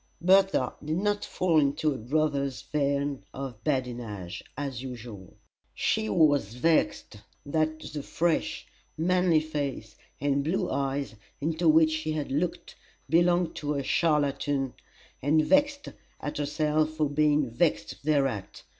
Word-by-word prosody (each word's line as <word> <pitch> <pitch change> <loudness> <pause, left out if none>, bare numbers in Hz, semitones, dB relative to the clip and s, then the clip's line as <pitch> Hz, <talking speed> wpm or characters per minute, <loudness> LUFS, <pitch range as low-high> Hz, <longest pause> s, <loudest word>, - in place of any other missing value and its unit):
Bertha 190 -6 +4
did 155 +2 -1
not 205 +2 0
fall 170 -4 +2
into 145 +1 +1
her 135 - -3
brother's 140 0 -1
vein 140 -1 -1
of 130 -5 -6
badinage, 120 - -3
as 135 -4 -4
usual. 115 -7 -9 0.4
She 110 - 0
was 140 -3 +3
vexed 155 -5 +1 0.3
that 155 +1 0
the 150 -1 -6
fresh, 165 +3 -1 0.3
manly 175 -1 +3
face 140 -8 -4 0.2
and 140 0 +1
blue 180 +5 -1
eyes 140 -1 -1 0.3
into 160 +2 +1
which 160 0 +5
she 155 0 -2
had 150 -3 -3
looked 165 +5 -2 0.4
belonged 175 +1 +3
to 150 0 -2
a 140 - -1
charlatan, 145 -3 +1 0.5
and 155 +3 +3
vexed 285 - +2 0.3
at 150 - -4
herself 150 +1 +1
for 155 -1 +1
being 150 0 +2
vexed 105 -1 0
thereat. 135 -9 0
145 Hz, 130 wpm, -28 LUFS, 135-160 Hz, 0.5 s, which